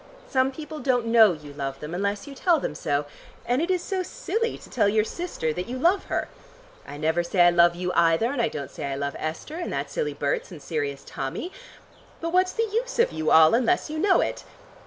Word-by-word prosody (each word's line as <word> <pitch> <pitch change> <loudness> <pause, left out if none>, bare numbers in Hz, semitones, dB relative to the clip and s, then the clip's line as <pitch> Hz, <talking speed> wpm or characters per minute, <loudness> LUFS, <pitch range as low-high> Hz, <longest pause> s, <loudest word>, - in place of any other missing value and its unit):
Some 260 0 +2
people 305 +2 -8
don't 250 -4 +1
know 225 -4 +6
you 150 -3 -10
love 135 -1 -4
them 150 +2 -7
unless 200 +3 -2
you 285 - -9
tell 335 +3 +2
them - - -3
so, 145 -1 -1 0.4
and 245 +4 +1
it 340 - -1
is 365 -2 +1
so 380 -2 -2
silly 460 +3 -2
to - - -14
tell 210 -5 +2
your 215 +1 +3
sister 220 - -3
that 180 +3 -4
you 250 +2 -4
love 345 +9 +2
her. - - -2 0.6
I 145 - -8
never 160 +3 +1
say 175 +2 +1
I 175 0 +7
love 170 0 +5
you, 180 +1 -2
either, 170 +8 +3
and 280 -4 -1
I 230 - +2
don't 140 -9 -6
say - - -6
I 140 -1 -2
love 140 0 -3
Esther, 160 - -5
and 350 - -4
that - - -3
silly 465 -3 -2
Berts, - - -1
and - - -9
serious 440 -2 -3
Tommy. 360 - -5 0.7
But 335 +1 -4
what's 370 0 +3
the 455 - 0
use - - -1
of 475 - +3
you 155 0 -1
all 160 0 +7
unless 280 +7 +2
you 310 - -3
know 385 +2 +4
it? - - -3
235 Hz, 230 wpm, -25 LUFS, -, 0.7 s, I